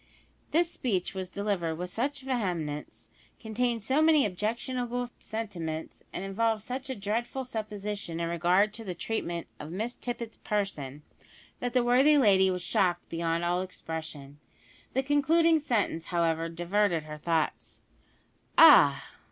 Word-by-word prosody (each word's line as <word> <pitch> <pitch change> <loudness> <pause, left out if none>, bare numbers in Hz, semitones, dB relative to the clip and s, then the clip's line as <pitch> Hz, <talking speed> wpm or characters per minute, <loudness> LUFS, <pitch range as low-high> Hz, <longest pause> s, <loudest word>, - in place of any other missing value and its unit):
This 335 +1 +2
speech 195 -9 -1
was 190 -1 -5
delivered 190 -5 -1
with 180 +2 -5
such 275 +6 -2
vehemence, 180 - -3 0.3
contained 230 0 -1
so 270 +7 +2
many 315 -2 +5
objectionable 240 +5 -2
sentiments, 175 -8 -5
and 185 - -5
involved 220 +2 0
such 260 +4 -5
a 260 - -2
dreadful 235 +6 -2
supposition 210 -6 -4
in 170 - -1
regard 180 +5 +2
to 225 - -7
the 185 -4 -5
treatment 170 -4 -3
of 150 - -7
Miss 220 +7 -3
Tippet's 235 -2 -5
person, 150 -9 -3 0.6
that 245 -1 -3
the 250 -2 +3
worthy 265 +5 +5
lady 195 -7 +5
was 180 -1 -2
shocked 175 -1 +1
beyond 165 0 -1
all 175 +1 +1
expression. 160 -6 -7 0.5
The 265 - +1
concluding 320 +4 +4
sentence, 225 - 0
however, 165 -1 0
diverted 175 0 0
her 150 0 -8
thoughts. 165 0 -1 0.8
"Ah! - - +8
205 Hz, 135 wpm, -29 LUFS, 170-245 Hz, 0.8 s, Ah